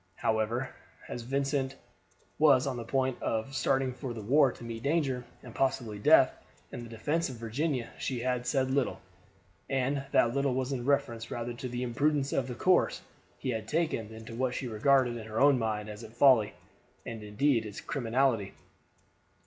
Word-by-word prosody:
However, 110 +4 0 0.4
as 120 - -5
Vincent 135 +1 -1 0.6
was 140 -4 +6
on 135 -2 -2
the 120 - -5
point 130 +1 -1
of 110 +4 -2
starting 135 -1 +1
for 125 -2 -6
the 110 - -6
war 135 +4 +4
to - - -12
meet 115 -1 -6
danger, 140 -3 0 0.2
and 120 - -10
possibly 120 -6 -1
death, 140 +2 +6 0.4
in - - -6
the 120 - -9
defense 150 +9 -1
of 130 - -6
Virginia, 120 +3 -2
she 125 -3 -2
had 125 0 -1
said 130 0 +1
little, 135 -1 0 0.7
and 135 +1 0
that 115 - +4
little 140 -1 +1
was 130 +1 -1
in 125 -3 -3
reference 120 -5 0
rather 120 0 -4
to 125 +2 -6
the 125 +1 -3
imprudence 140 +3 +1
of 130 - 0
the 125 - -5
course 185 +8 +2 0.3
he 130 - -2
had 110 -2 -4
taken 155 -9 -1
than 110 0 -10
to 115 - -9
what 125 +1 -1
she 130 - -3
regarded 120 +2 +3
in 110 -1 -8
her 110 0 -3
own 140 -2 +5
mind 110 -2 -2
as 105 +1 -8
its 115 +1 -12
folly, 120 -6 +5 0.5
and 115 -1 -6
indeed 115 +4 +1
its 105 -2 -7
criminality. 125 -5 0
125 Hz, 180 wpm, -30 LUFS, 115-135 Hz, 0.7 s, was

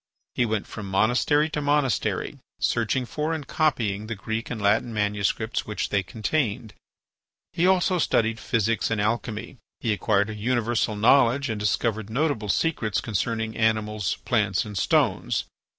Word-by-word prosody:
He 120 - +1
went 110 -2 -1
from 105 -3 -7
monastery 125 +9 +3
to 150 - -2
monastery, 145 -3 0 0.2
searching 120 +2 0
for 150 +5 -2
and 150 -3 -6
copying 110 - 0
the 115 - -3
Greek 110 +3 -4
and 115 - -4
Latin 105 +3 +2
manuscripts 105 +2 -1
which 105 - -2
they 100 - +2
contained. 110 - -2 0.8
He 175 +2 +2
also 185 -1 +3
studied 115 -6 +1
physics 115 -1 0
and 115 -2 0
alchemy. 110 +3 -2 0.2
He 115 - 0
acquired 105 0 +1
a - - -6
universal 115 0 0
knowledge 125 +4 +4
and 110 - -3
discovered 110 +1 0
notable 125 -4 -1
secrets 110 - 0
concerning 110 +1 -2
animals, 110 -2 0
plants, 105 -6 +1
and 105 -1 -8
stones. 95 - +1
110 Hz, 145 wpm, -25 LUFS, 105-125 Hz, 0.8 s, knowledge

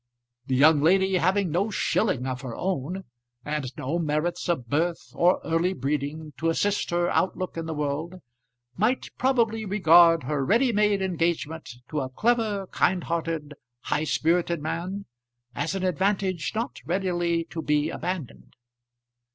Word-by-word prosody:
The 130 - +1
young 145 +2 +6
lady, 190 +4 +3
having 185 +1 +1
no 190 +7 +1
shilling 190 - 0
of 130 -1 -3
her 125 -4 -6
own, 185 +1 -3 0.4
and 150 -2 -2
no 155 +7 -2
merits 155 +3 -1
of 130 -9 -1
birth 165 +7 -1
or 180 +2 +3
early 165 +3 +1
breeding 150 +2 -3
to 165 - 0
assist 205 +5 0
her 175 0 +1
outlook 185 0 -1
in 165 -1 -4
the 160 - -3
world, 150 +4 -2 0.6
might 225 +7 0
probably 230 -4 +2
regard 170 -5 +5
her 140 +1 -1
ready 235 - +3
made 205 -2 +2
engagement 165 -3 -1 0.2
to 155 - -2
a 130 - -4
clever, 215 - 0
kind 180 0 +1
hearted, 165 -3 -3 0.3
high 155 - -1
spirited 170 +2 +1
man, 175 +6 -4 0.5
as 160 +6 -2
an 190 - -2
advantage 185 -1 0
not 230 +2 -3
readily 175 -2 0
to 165 - -4
be 150 0 +1
abandoned. 175 -5 -5
170 Hz, 145 wpm, -26 LUFS, 150-190 Hz, 0.6 s, young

